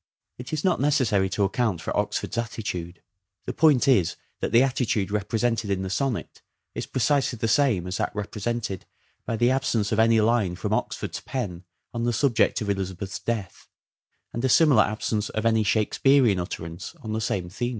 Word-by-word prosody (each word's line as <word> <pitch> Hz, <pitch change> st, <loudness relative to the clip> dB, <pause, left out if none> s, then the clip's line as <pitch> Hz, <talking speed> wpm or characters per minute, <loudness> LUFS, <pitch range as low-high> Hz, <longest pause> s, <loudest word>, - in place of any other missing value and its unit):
It 125 Hz, -, -8 dB
is 155 Hz, -1 st, -2 dB
not 185 Hz, -6 st, +2 dB
necessary 120 Hz, -10 st, +2 dB
to 100 Hz, -, 0 dB
account 100 Hz, -2 st, 0 dB
for -, -, -4 dB
Oxford's -, -, -1 dB
attitude: 100 Hz, -7 st, -4 dB, 0.4 s
the -, -, -3 dB
point 150 Hz, -6 st, +4 dB
is 95 Hz, -11 st, +3 dB, 0.2 s
that -, -, -2 dB
the 120 Hz, +2 st, +6 dB
attitude 120 Hz, -6 st, 0 dB
represented 110 Hz, +1 st, -1 dB
in 95 Hz, -1 st, -1 dB
the 95 Hz, -, -4 dB
sonnet 130 Hz, +1 st, -2 dB, 0.3 s
is -, -, -5 dB
precisely 130 Hz, -1 st, +1 dB
the 115 Hz, 0 st, -1 dB
same 115 Hz, -, +2 dB
as 90 Hz, +1 st, -3 dB
that -, -, 0 dB
represented 105 Hz, -1 st, -3 dB, 0.4 s
by 115 Hz, -, -1 dB
the 120 Hz, +3 st, +3 dB
absence 120 Hz, -5 st, 0 dB
of 110 Hz, -, +1 dB
any 115 Hz, 0 st, +5 dB
line 110 Hz, -5 st, +2 dB
from -, -, -3 dB
Oxford's -, -, -2 dB
pen 95 Hz, -9 st, -5 dB, 0.3 s
on 115 Hz, -1 st, -2 dB
the 120 Hz, -, +1 dB
subject 120 Hz, -2 st, +2 dB
of 105 Hz, -, -3 dB
Elizabeth's 95 Hz, 0 st, -4 dB
death, 110 Hz, -6 st, -4 dB, 0.7 s
and 120 Hz, -, -3 dB
a 130 Hz, -, +2 dB
similar 140 Hz, -4 st, +6 dB
absence 105 Hz, 0 st, -2 dB
of 110 Hz, 0 st, -3 dB
any 110 Hz, -1 st, +3 dB
Shakespearean 110 Hz, +1 st, +3 dB
utterance 85 Hz, -, -6 dB
on 110 Hz, -1 st, -4 dB
the 110 Hz, -, -1 dB
same 95 Hz, -4 st, -1 dB
theme. 120 Hz, +7 st, -3 dB
110 Hz, 180 wpm, -25 LUFS, 100-120 Hz, 0.7 s, the